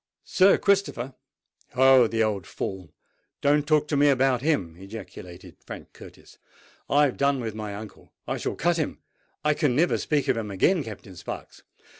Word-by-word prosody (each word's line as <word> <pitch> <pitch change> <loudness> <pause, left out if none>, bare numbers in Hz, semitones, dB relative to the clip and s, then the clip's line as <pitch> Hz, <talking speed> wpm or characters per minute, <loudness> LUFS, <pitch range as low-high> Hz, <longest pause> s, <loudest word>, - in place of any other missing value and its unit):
"Sir 190 +1 +4
Christopher! 195 - 0 0.6
Oh! 130 -2 +6
the 115 0 0
old 105 -4 -2
fool—don't 140 - -3
talk 150 -1 +3
to 150 - 0
me 145 +1 +4
about 130 -2 +2
him!" 100 - 0
ejaculated 95 -3 -10
Frank - - -10
Curtis. - - -15 0.5
"I 145 +1 +4
have 135 - -2
done 140 -1 +2
with 115 -3 -4
my 105 -2 -6
uncle—I 110 0 -8
shall - - -3
cut 175 0 +1
him—I 150 -1 -4
can 145 -5 0
never 170 +5 +2
speak 150 -2 0
to - - +2
him 110 -2 -4
again, 155 - +2
Captain 100 -4 -10
Sparks. 85 - -8
130 Hz, 155 wpm, -25 LUFS, 105-150 Hz, 0.6 s, Oh